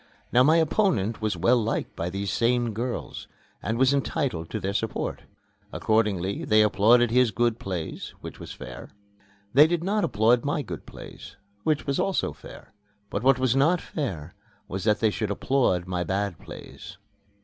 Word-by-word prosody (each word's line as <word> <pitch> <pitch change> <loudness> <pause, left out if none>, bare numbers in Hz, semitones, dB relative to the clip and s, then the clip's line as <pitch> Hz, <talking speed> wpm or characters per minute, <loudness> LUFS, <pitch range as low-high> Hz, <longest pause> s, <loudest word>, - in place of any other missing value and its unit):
Now 125 - +5
my 155 +5 +5
opponent 160 - +1
was 105 -4 -1
well 115 +8 +3
liked 115 - -2
by 85 - -3
these 100 +1 -3
same 120 -1 +1
girls 120 +3 -4 0.3
and 110 +1 -2
was 130 +2 +4
entitled 135 - -1
to - - -3
their 100 +1 -3
support. 110 +1 -3 0.5
Accordingly 100 -4 0
they 110 0 +4
applauded 115 +3 +4
his 125 0 +4
good 115 +2 0
plays, 90 -5 -5
which - - -9
was - - -8
fair. 65 -1 -9 0.6
They 145 +4 +8
did 170 0 -1
not 205 +3 0
applaud 115 +4 +3
my - - -1
good - - -8
plays, - - -11 0.3
which 155 +5 0
was 140 -1 -1
also 195 - 0
fair. - - -13 0.4
But 100 - -2
what 135 +1 +4
was 130 -1 +1
not 160 +6 +3
fair 90 - -5 0.3
was 95 +1 -5
that 105 -1 +2
they 110 -2 +3
should 110 -1 -2
applaud 100 -4 +1
my 90 -1 -2
bad 95 -2 -2
plays. - - -11
115 Hz, 170 wpm, -26 LUFS, 100-130 Hz, 0.6 s, They